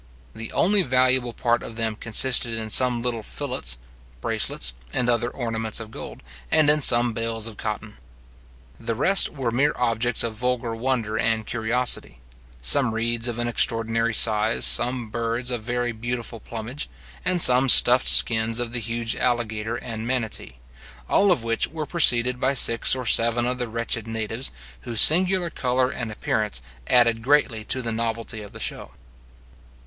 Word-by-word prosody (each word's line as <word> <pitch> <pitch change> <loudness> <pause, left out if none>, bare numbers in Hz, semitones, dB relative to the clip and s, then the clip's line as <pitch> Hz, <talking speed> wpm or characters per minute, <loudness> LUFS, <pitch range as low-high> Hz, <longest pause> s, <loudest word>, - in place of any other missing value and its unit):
The 115 0 -8
only 200 +3 +2
valuable 130 -3 +1
part 120 0 -2
of 115 - -10
them 110 -1 -3
consisted 115 +1 +2
in 110 -1 -7
some 125 -1 +1
little 120 -2 -3
fillets, 110 - -4 0.4
bracelets, - - -2 0.2
and 125 - -2
other 120 0 0
ornaments 115 -3 -4
of 110 -1 -10
gold, - - -11 0.3
and 155 -2 +3
in 150 0 +1
some 120 -2 +3
bales 115 0 -3
of 110 -3 -6
cotton. 105 -1 -7 0.8
The 115 - -5
rest 190 - +3
were 130 -5 -4
mere 140 +5 0
objects 120 -1 -1
of 115 -1 -4
vulgar 125 0 -3
wonder 115 -2 -3
and 110 -1 -2
curiosity; 120 - 0 0.4
some 120 - +3
reeds 115 +1 -1
of 120 -1 -4
an 120 0 -2
extraordinary 115 -1 0
size, 110 +1 +4
some 120 -1 +6
birds 115 +2 -4
of 120 - -2
a - - -17
very 120 +1 -3
beautiful 120 0 -6
plumage, 115 +7 -8 0.3
and 180 -1 -1
some 130 -3 +5
stuffed 125 +1 +6
skins 115 0 +5
of 120 -1 -4
the 120 - 0
huge 115 +1 -4
alligator 115 -2 -3
and 115 -2 -7
manati; 115 - -4 0.5
all 200 -1 +2
of 130 -10 -1
which 115 0 -2
were 155 0 -7
preceded 125 -7 +3
by 135 +2 -1
six 115 -1 +4
or 130 -1 -7
seven 115 +1 +2
of 125 +1 -4
the 125 - -3
wretched 115 0 -3
natives, 110 +3 -3 0.3
whose 120 -3 -3
singular 180 - +5
colour 125 0 -2
and 120 -3 -6
appearance 105 - -3 0.3
added 115 -2 +2
greatly 130 -4 0
to 130 +2 -2
the 115 - -3
novelty 115 -1 -4
of 105 - -12
the - - -12
show. - - -4
120 Hz, 165 wpm, -22 LUFS, 115-125 Hz, 0.8 s, some